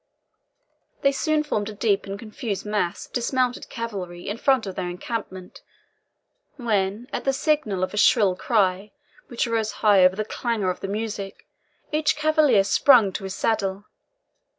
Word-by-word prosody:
They 275 Hz, -, +5 dB
soon 305 Hz, +2 st, 0 dB
formed 215 Hz, -8 st, -2 dB
a -, -, -7 dB
deep 205 Hz, -2 st, 0 dB
and 195 Hz, 0 st, -5 dB
confused 215 Hz, -1 st, -5 dB
mass 210 Hz, -5 st, -2 dB
of -, -, -25 dB
dismounted 250 Hz, 0 st, -1 dB
cavalry 190 Hz, -7 st, -6 dB
in 205 Hz, -, -3 dB
front 265 Hz, -5 st, +2 dB
of 190 Hz, -, -5 dB
their 180 Hz, -1 st, -4 dB
encampment, 185 Hz, 0 st, -6 dB, 0.9 s
when, 215 Hz, -3 st, -1 dB
at -, -, -3 dB
the 270 Hz, -, +2 dB
signal 270 Hz, -, 0 dB
of 185 Hz, -, -2 dB
a -, -, -5 dB
shrill 210 Hz, -4 st, +4 dB
cry, 195 Hz, -1 st, 0 dB, 0.3 s
which 240 Hz, -, -1 dB
arose 225 Hz, -2 st, -1 dB
high 200 Hz, -3 st, +6 dB
over 185 Hz, +1 st, +5 dB
the 215 Hz, +1 st, -2 dB
clangour 220 Hz, -5 st, -1 dB
of -, -, -8 dB
the -, -, -5 dB
music, 205 Hz, -1 st, -5 dB, 0.5 s
each 305 Hz, 0 st, +1 dB
cavalier 300 Hz, -8 st, +3 dB
sprung 225 Hz, 0 st, +5 dB
to 195 Hz, +1 st, -5 dB
his 190 Hz, 0 st, -5 dB
saddle. 200 Hz, -2 st, -1 dB
215 Hz, 160 wpm, -24 LUFS, 195-245 Hz, 0.9 s, high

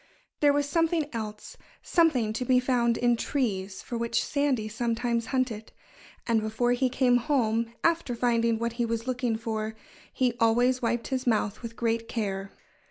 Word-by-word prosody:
There 290 Hz, -1 st, +5 dB
was 285 Hz, 0 st, +1 dB
something 330 Hz, 0 st, +1 dB
else 215 Hz, -2 st, -6 dB, 0.3 s
something 265 Hz, -11 st, +2 dB
to 240 Hz, -, -2 dB
be 250 Hz, 0 st, +4 dB
found 245 Hz, -2 st, +1 dB
in 240 Hz, -1 st, +3 dB
trees 205 Hz, -7 st, -2 dB
for 235 Hz, -, -4 dB
which 235 Hz, 0 st, 0 dB
Sandy 280 Hz, -7 st, 0 dB
sometimes 235 Hz, +1 st, -1 dB
hunted. 250 Hz, -5 st, -2 dB, 0.5 s
And 230 Hz, -2 st, +2 dB
before 220 Hz, +3 st, 0 dB
he 255 Hz, +1 st, +2 dB
came 250 Hz, -1 st, +3 dB
home, 235 Hz, -4 st, 0 dB
after 335 Hz, -7 st, +1 dB
finding 230 Hz, -1 st, +2 dB
what 235 Hz, 0 st, -2 dB
he -, -, +3 dB
was 230 Hz, 0 st, -2 dB
looking 250 Hz, -2 st, -1 dB
for, 220 Hz, -1 st, -3 dB, 0.4 s
he 250 Hz, -2 st, +1 dB
always 245 Hz, +3 st, +3 dB
wiped 235 Hz, 0 st, -1 dB
his 260 Hz, -1 st, -2 dB
mouth 215 Hz, -3 st, +1 dB
with 230 Hz, -1 st, -7 dB
great 230 Hz, -1 st, -1 dB
care. 195 Hz, -3 st, -3 dB
235 Hz, 165 wpm, -27 LUFS, 225-255 Hz, 0.5 s, There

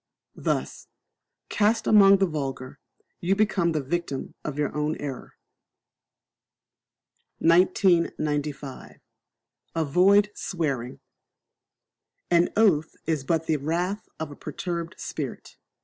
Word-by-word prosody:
Thus, -, -, -2 dB, 0.6 s
cast 220 Hz, +2 st, +1 dB
among 200 Hz, -2 st, +7 dB
the 195 Hz, -, +3 dB
vulgar, 135 Hz, -6 st, -5 dB, 0.4 s
you 185 Hz, +3 st, +1 dB
become 195 Hz, -5 st, +2 dB
the 155 Hz, -3 st, -1 dB
victim 145 Hz, -1 st, -3 dB
of 150 Hz, -2 st, -5 dB
your 150 Hz, 0 st, -1 dB
own 150 Hz, +1 st, 0 dB
error. 135 Hz, -4 st, -7 dB, 2.0 s
1995. 155 Hz, -5 st, +1 dB, 0.8 s
Avoid 185 Hz, +7 st, +4 dB
Swearing. 140 Hz, -12 st, -3 dB, 1.3 s
An 175 Hz, 0 st, +4 dB
oath 180 Hz, -9 st, +3 dB
is 155 Hz, -4 st, -1 dB
but 165 Hz, +3 st, 0 dB
the 155 Hz, -, +1 dB
wrath 175 Hz, +8 st, -2 dB
of 160 Hz, -2 st, -4 dB
a -, -, -9 dB
perturbed 170 Hz, +4 st, -5 dB
spirit. -, -, -6 dB
165 Hz, 100 wpm, -25 LUFS, 145-185 Hz, 2.0 s, among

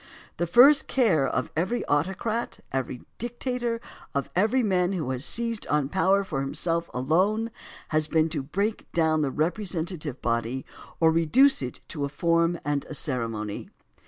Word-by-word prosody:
The 175 Hz, -, 0 dB
first 265 Hz, -, +7 dB
care 185 Hz, -, +3 dB
of 125 Hz, -1 st, -2 dB
every 185 Hz, +10 st, -1 dB
autocrat, 190 Hz, +10 st, -1 dB
of -, -, -25 dB
every 130 Hz, -2 st, -3 dB, 0.2 s
dictator, 240 Hz, 0 st, -2 dB, 0.4 s
of 140 Hz, -, -2 dB
every 220 Hz, +7 st, +3 dB
man 185 Hz, -2 st, +1 dB
who 155 Hz, -8 st, -2 dB
has 130 Hz, 0 st, -2 dB
seized 230 Hz, +2 st, -1 dB
on 145 Hz, -2 st, +1 dB
power 190 Hz, +3 st, +3 dB
for 155 Hz, -8 st, -3 dB
himself 165 Hz, +4 st, -1 dB
alone, 190 Hz, -, +1 dB, 0.4 s
has 155 Hz, -1 st, +1 dB
been 160 Hz, 0 st, +2 dB
to 155 Hz, -3 st, -2 dB
break 200 Hz, +10 st, -3 dB
down 160 Hz, -2 st, +2 dB
the 145 Hz, -, +1 dB
represent 170 Hz, +3 st, -1 dB
ative 150 Hz, -6 st, -5 dB
body 120 Hz, +2 st, -1 dB, 0.3 s
or 160 Hz, -1 st, +5 dB
to -, -, -2 dB
reduce 260 Hz, -, +4 dB
it 125 Hz, -2 st, -5 dB
to 145 Hz, -, -4 dB
a 140 Hz, -, -1 dB
form 170 Hz, +2 st, +1 dB
and 145 Hz, -1 st, 0 dB
a 155 Hz, -, -5 dB
ceremony. 115 Hz, -8 st, -3 dB
165 Hz, 165 wpm, -26 LUFS, 140-205 Hz, 0.4 s, first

